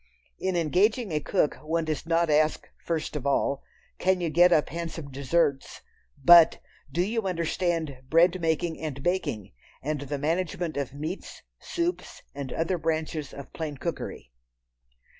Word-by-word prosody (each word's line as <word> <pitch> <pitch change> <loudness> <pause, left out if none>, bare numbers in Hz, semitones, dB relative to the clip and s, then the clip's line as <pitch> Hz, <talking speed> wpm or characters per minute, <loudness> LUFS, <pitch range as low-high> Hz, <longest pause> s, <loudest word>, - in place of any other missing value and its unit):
In 190 -1 -1
engaging 195 - +2
a 155 - +1
cook 150 0 0
one 160 +2 -2
does 155 +1 -3
not 165 -1 +2
ask, 155 +1 +2 0.2
first 160 -2 -2
of 140 -2 -2
all, 140 0 +1 0.4
"Can 185 0 +2
you 170 -3 -1
get 175 +3 +6
up 155 -3 +3
handsome 165 -3 -5
desserts?" 140 +1 0 0.4
but, 165 +4 +8 0.3
"Do 175 +5 +1
you 220 +1 -1
understand 165 -4 -1
bread 170 +3 +4
making 165 0 0
and 140 -4 -5
baking, 175 - -1 0.3
and 150 0 -2
the 145 +1 -3
management 165 +2 -1
of 140 -2 -2
meats, 155 +6 -6 0.2
soups, 345 +1 -3
and 140 -2 -6
other 165 +2 -1
branches 160 -2 -2
of 140 -2 -10
plain 155 -3 -4
cookery?" 155 - -5
160 Hz, 145 wpm, -27 LUFS, 145-175 Hz, 0.4 s, but